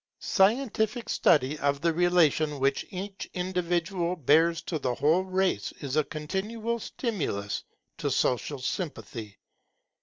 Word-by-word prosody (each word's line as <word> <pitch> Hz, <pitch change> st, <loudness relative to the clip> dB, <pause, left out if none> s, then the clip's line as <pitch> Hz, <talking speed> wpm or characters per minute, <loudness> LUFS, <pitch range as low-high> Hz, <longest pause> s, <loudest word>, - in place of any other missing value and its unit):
Scientific 220 Hz, +2 st, +1 dB
study 145 Hz, +1 st, +3 dB
of 140 Hz, 0 st, 0 dB
the 170 Hz, -1 st, +2 dB
relation 160 Hz, -4 st, +3 dB
which 135 Hz, +1 st, +1 dB
each 195 Hz, +1 st, -6 dB
individual 180 Hz, -1 st, -1 dB
bears 165 Hz, +2 st, +3 dB
to 160 Hz, -3 st, -3 dB
the 125 Hz, -3 st, -1 dB
whole 160 Hz, +8 st, +3 dB
race 190 Hz, 0 st, 0 dB
is 140 Hz, -2 st, -5 dB
a 155 Hz, -, +4 dB
continual 210 Hz, +10 st, -3 dB
stimulus 155 Hz, -, -3 dB, 0.4 s
to -, -, -1 dB
social 130 Hz, +3 st, 0 dB
sympathy. 125 Hz, -, -5 dB
170 Hz, 120 wpm, -28 LUFS, 145-190 Hz, 0.4 s, a